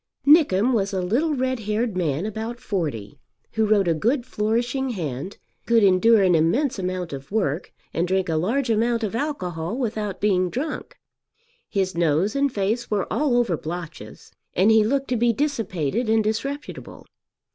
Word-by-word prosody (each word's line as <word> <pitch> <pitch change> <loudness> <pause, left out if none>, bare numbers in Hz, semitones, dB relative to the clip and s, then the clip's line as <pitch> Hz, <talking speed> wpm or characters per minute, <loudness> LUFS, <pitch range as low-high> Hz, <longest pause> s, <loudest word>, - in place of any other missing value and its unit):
Nickem 260 - +5
was 200 -3 0
a 190 - 0
little 280 - +1
red 260 -1 -1
haired 215 0 -1
man 165 -1 -1
about 220 +3 -5
forty, 150 - -4 0.3
who 220 -1 +1
wrote 205 -3 +3
a 170 - +3
good 235 - 0
flourishing 240 +4 -1
hand, 165 - -4 0.3
could 230 -2 +4
endure 200 +3 +5
an 185 -2 +4
immense 195 - +2
amount 185 -3 -3
of 135 +3 -8
work, 185 -6 -1 0.2
and 170 +2 0
drink 190 0 0
a 165 - -1
large 230 - 0
amount 230 +1 +1
of 215 - -2
alcohol 205 - -3
without 215 -6 -3
being 185 -3 +2
drunk. 290 - -5 0.7
His 190 -3 -1
nose 170 - +1
and 280 0 +2
face 215 +3 -1
were 205 -3 0
all 285 -5 +2
over 235 -8 +2
blotches, 165 0 -8 0.2
and 200 +4 +4
he 220 -1 +5
looked 270 +5 0
to 250 - +1
be 235 +1 +3
dissipated 225 - -1
and 220 0 +3
disreputable. 275 +7 -4
210 Hz, 165 wpm, -23 LUFS, 180-240 Hz, 0.7 s, Nickem